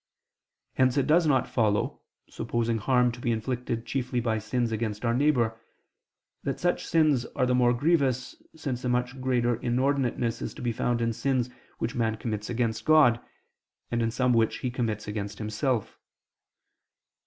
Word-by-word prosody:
Hence 130 Hz, +1 st, +2 dB
it 135 Hz, -, +3 dB
does 160 Hz, +2 st, +4 dB
not 130 Hz, -4 st, +2 dB
follow, 105 Hz, -4 st, 0 dB, 0.3 s
supposing 115 Hz, 0 st, -1 dB
harm 125 Hz, +2 st, +3 dB
to 120 Hz, -, -10 dB
be 120 Hz, -, -1 dB
inflicted 115 Hz, 0 st, -2 dB
chiefly 125 Hz, 0 st, -1 dB
by 115 Hz, -2 st, 0 dB
sins 115 Hz, +2 st, -1 dB
against 110 Hz, 0 st, -3 dB
our 115 Hz, -, +2 dB
neighbor, 120 Hz, -5 st, +2 dB, 0.8 s
that -, -, -3 dB
such 175 Hz, 0 st, 0 dB
sins 155 Hz, -7 st, +3 dB
are 130 Hz, -, +2 dB
the 125 Hz, -, +1 dB
most 120 Hz, -1 st, +3 dB
grievous, 140 Hz, -5 st, +1 dB, 0.2 s
since 135 Hz, -5 st, -4 dB
a 125 Hz, -, 0 dB
much 125 Hz, +1 st, -1 dB
greater 120 Hz, -2 st, +1 dB
inordinateness 125 Hz, -1 st, 0 dB
is -, -, -5 dB
to -, -, -8 dB
be 120 Hz, -, +1 dB
found 120 Hz, +1 st, -1 dB
in 115 Hz, 0 st, +1 dB
sins 125 Hz, 0 st, 0 dB, 0.3 s
which 115 Hz, -, -2 dB
man 110 Hz, -2 st, 0 dB
commits 105 Hz, -2 st, -4 dB
against 115 Hz, -2 st, -1 dB
God, 150 Hz, -7 st, +5 dB, 0.7 s
and 120 Hz, 0 st, 0 dB
in 115 Hz, -, +1 dB
some 125 Hz, +2 st, +1 dB
which 115 Hz, -1 st, +1 dB
he 125 Hz, -, -1 dB
commits 115 Hz, -4 st, -2 dB
against 105 Hz, 0 st, -4 dB
himself. 110 Hz, +2 st, -2 dB
120 Hz, 165 wpm, -27 LUFS, 115-130 Hz, 0.8 s, God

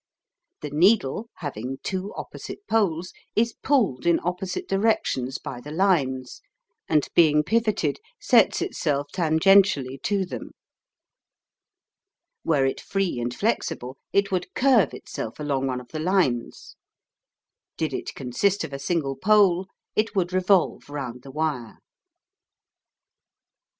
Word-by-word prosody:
The 150 Hz, -, -5 dB
needle, 190 Hz, -, +2 dB
having 135 Hz, -4 st, -5 dB
two 190 Hz, +1 st, -3 dB
opposite 405 Hz, -, -8 dB
poles, 180 Hz, -6 st, 0 dB, 0.2 s
is 230 Hz, +1 st, +2 dB
pulled 205 Hz, -, +1 dB
in 170 Hz, -, +4 dB
opposite 180 Hz, +2 st, -3 dB
directions 195 Hz, -, 0 dB
by 120 Hz, -, -7 dB
the 145 Hz, -, -9 dB
lines, 145 Hz, -8 st, 0 dB, 0.5 s
and 150 Hz, -2 st, +2 dB
being 150 Hz, -3 st, +5 dB
pivoted, 215 Hz, -6 st, 0 dB, 0.2 s
sets -, -, +4 dB
itself 145 Hz, 0 st, -1 dB
tangentically 160 Hz, -5 st, +3 dB
to 200 Hz, -2 st, 0 dB
them. 125 Hz, -9 st, -7 dB, 1.9 s
Were 145 Hz, -4 st, +2 dB
it 135 Hz, -, -1 dB
free 195 Hz, -9 st, -1 dB
and 120 Hz, 0 st, -2 dB
flexible, 130 Hz, -, -2 dB, 0.2 s
it 200 Hz, 0 st, +2 dB
would 185 Hz, -1 st, -2 dB
curve 250 Hz, -, +4 dB
itself 110 Hz, -, -7 dB
along 140 Hz, -3 st, -1 dB
one 130 Hz, -1 st, -2 dB
of 125 Hz, -, -13 dB
the 155 Hz, -, -5 dB
lines. 160 Hz, -9 st, -1 dB, 1.0 s
Did -, -, -1 dB
it -, -, -5 dB
consist 180 Hz, +11 st, 0 dB
of 155 Hz, -3 st, -6 dB
a 140 Hz, -, -4 dB
single 140 Hz, -2 st, -1 dB
pole, 190 Hz, -2 st, +3 dB, 0.3 s
it 215 Hz, +1 st, 0 dB
would 180 Hz, -2 st, 0 dB
revolve 185 Hz, -4 st, +2 dB
round 130 Hz, -4 st, -5 dB
the 135 Hz, -, -12 dB
wire. 140 Hz, -5 st, -3 dB
165 Hz, 125 wpm, -25 LUFS, 135-195 Hz, 1.9 s, being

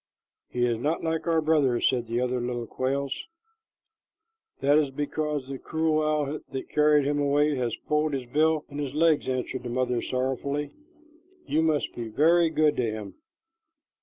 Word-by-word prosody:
"He 120 Hz, 0 st, 0 dB
is 120 Hz, -2 st, 0 dB
not 150 Hz, +6 st, -1 dB
like 160 Hz, 0 st, -2 dB
our 165 Hz, -1 st, +3 dB
brother," 150 Hz, -6 st, +2 dB
said 120 Hz, -3 st, +1 dB
the 120 Hz, +2 st, -1 dB
other 125 Hz, 0 st, -1 dB
little 120 Hz, -1 st, -3 dB
quails. 135 Hz, +3 st, -2 dB, 1.4 s
"That 145 Hz, +2 st, +4 dB
is 145 Hz, -3 st, +1 dB
because 145 Hz, 0 st, -3 dB
the 135 Hz, -1 st, -6 dB
cruel 160 Hz, -1 st, 0 dB
owl 150 Hz, -1 st, 0 dB
that 135 Hz, -1 st, -6 dB
carried 150 Hz, -1 st, +4 dB
him 145 Hz, +1 st, 0 dB
away 145 Hz, +1 st, +2 dB
has 120 Hz, -2 st, -1 dB
pulled 150 Hz, 0 st, +1 dB
his 130 Hz, -2 st, -2 dB
bill 155 Hz, +4 st, +1 dB
and 145 Hz, 0 st, -6 dB
his 140 Hz, -1 st, -4 dB
legs," 160 Hz, -1 st, +3 dB
answered 130 Hz, 0 st, -2 dB
the 120 Hz, -, -6 dB
mother 125 Hz, -1 st, 0 dB
sorrowfully. 140 Hz, +3 st, -2 dB, 0.7 s
"You 155 Hz, -, +1 dB
must 155 Hz, -2 st, 0 dB
be 120 Hz, -1 st, -5 dB
very 165 Hz, +8 st, +4 dB
good 155 Hz, -1 st, +2 dB
to 115 Hz, -3 st, 0 dB
him." 105 Hz, -3 st, -7 dB
145 Hz, 165 wpm, -27 LUFS, 125-155 Hz, 1.4 s, That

